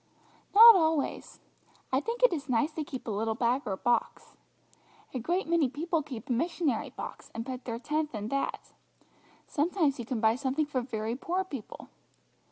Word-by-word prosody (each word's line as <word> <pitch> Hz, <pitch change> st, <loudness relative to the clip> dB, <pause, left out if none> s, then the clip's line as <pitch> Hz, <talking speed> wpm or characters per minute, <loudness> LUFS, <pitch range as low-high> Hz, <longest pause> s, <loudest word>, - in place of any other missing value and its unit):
"Not 460 Hz, +2 st, +12 dB
always. 320 Hz, -6 st, 0 dB, 0.5 s
I 265 Hz, +1 st, +2 dB
think 465 Hz, +7 st, -4 dB
it -, -, +6 dB
is 295 Hz, -3 st, -5 dB
nice 255 Hz, +6 st, +2 dB
to 310 Hz, 0 st, -4 dB
keep 265 Hz, -3 st, -7 dB
a -, -, -1 dB
little 220 Hz, +2 st, -1 dB
bag 240 Hz, +3 st, +1 dB
or 190 Hz, -2 st, -2 dB
box. 240 Hz, +2 st, -1 dB, 0.8 s
A 255 Hz, -, -2 dB
great 350 Hz, -, -1 dB
many 330 Hz, -5 st, +2 dB
people 325 Hz, +4 st, -1 dB
keep 260 Hz, -7 st, -8 dB
a -, -, -4 dB
missionary 300 Hz, -1 st, 0 dB
box -, -, -8 dB
and 230 Hz, 0 st, -4 dB
put 255 Hz, -1 st, -6 dB
their 230 Hz, -2 st, -3 dB
tenth 300 Hz, +2 st, -2 dB
in 210 Hz, +1 st, -4 dB
that. 275 Hz, +2 st, -3 dB, 0.7 s
Sometimes 305 Hz, -2 st, 0 dB
you 240 Hz, -, -4 dB
can 250 Hz, -4 st, -2 dB
buy 220 Hz, 0 st, +4 dB
something 270 Hz, +4 st, -1 dB
for 275 Hz, -3 st, -2 dB
very 225 Hz, -2 st, -3 dB
poor 355 Hz, +8 st, -1 dB
people. 275 Hz, -, -9 dB
275 Hz, 175 wpm, -29 LUFS, 235-320 Hz, 0.8 s, Not